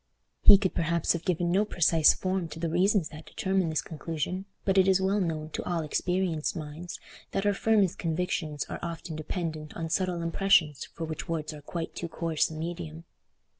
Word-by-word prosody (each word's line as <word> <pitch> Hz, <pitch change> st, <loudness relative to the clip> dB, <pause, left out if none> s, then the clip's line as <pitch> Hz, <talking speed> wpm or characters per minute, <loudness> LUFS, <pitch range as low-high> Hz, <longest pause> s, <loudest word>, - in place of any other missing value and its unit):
He 200 Hz, -, +10 dB
could 190 Hz, -1 st, -1 dB
perhaps 170 Hz, 0 st, +1 dB
have 170 Hz, -1 st, -5 dB
given 175 Hz, -2 st, +1 dB
no 195 Hz, +3 st, +4 dB
precise 165 Hz, -6 st, +4 dB
form 185 Hz, -2 st, -1 dB
to 160 Hz, 0 st, -9 dB
the 165 Hz, -1 st, -1 dB
reasons 185 Hz, 0 st, +2 dB
that 155 Hz, 0 st, -11 dB
determined 190 Hz, -2 st, 0 dB
this 155 Hz, -, 0 dB
conclusion, 165 Hz, +4 st, -4 dB, 0.2 s
but 195 Hz, -1 st, +4 dB
it 190 Hz, -, +5 dB
is 190 Hz, -1 st, +5 dB
well 195 Hz, +2 st, +1 dB
known 160 Hz, -3 st, -2 dB
to -, -, -3 dB
all 170 Hz, -2 st, -1 dB
experienced 175 Hz, 0 st, -1 dB
minds 160 Hz, +2 st, -6 dB, 0.3 s
that 195 Hz, -, 0 dB
our 205 Hz, -, +4 dB
firmest 200 Hz, -3 st, +2 dB
convictions 160 Hz, -3 st, -1 dB
are -, -, -6 dB
often 170 Hz, -1 st, -5 dB
dependent 155 Hz, -1 st, -4 dB
on 165 Hz, -1 st, -3 dB
subtle 180 Hz, -1 st, 0 dB
impressions 165 Hz, -4 st, +3 dB
for 165 Hz, -, -6 dB
which 155 Hz, 0 st, -6 dB
words 155 Hz, -1 st, -2 dB
are 150 Hz, -, -9 dB
quite 165 Hz, +3 st, -5 dB
too 170 Hz, -, -4 dB
coarse 165 Hz, -1 st, 0 dB
a 160 Hz, -, -8 dB
medium. 165 Hz, 0 st, -5 dB
170 Hz, 190 wpm, -28 LUFS, 160-185 Hz, 0.3 s, He